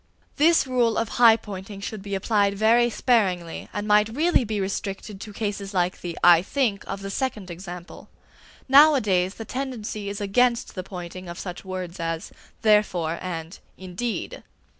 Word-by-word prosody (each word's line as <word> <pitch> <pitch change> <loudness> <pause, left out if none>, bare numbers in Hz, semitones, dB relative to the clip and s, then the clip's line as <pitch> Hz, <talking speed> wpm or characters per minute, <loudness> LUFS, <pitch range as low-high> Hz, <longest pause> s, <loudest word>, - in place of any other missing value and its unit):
This 325 +2 +4
rule 245 -3 +1
of 225 -1 -1
high 230 -2 +6
pointing 200 -2 -8
should 205 +1 -6
be 200 0 -4
applied 200 0 +1
very 235 +3 +4
sparingly, 190 -9 0
and 205 0 -4
might 210 +1 +4
really 305 +5 +2
be 215 -2 -3
restricted 195 +1 -4
to 215 - -8
cases 205 -2 -4
like 180 0 0
the 175 -2 -5
"I 175 -1 +8
think" 215 -1 -1
of 195 - -5
the 195 0 -5
second 210 -6 -3
example. 175 0 -9 0.6
Nowadays 250 -11 +5
the 225 - -7
tendency 225 -5 -4
is 200 - -5
against 235 +4 +1
the 185 - -4
pointing 180 -1 -8
of 170 - -7
such 180 -2 -7
words 185 -2 -6
as 165 0 -3 0.3
"therefore" 180 -6 +2
and 165 -1 -6 0.2
"indeed." 190 +6 -5
200 Hz, 160 wpm, -24 LUFS, 185-225 Hz, 0.6 s, I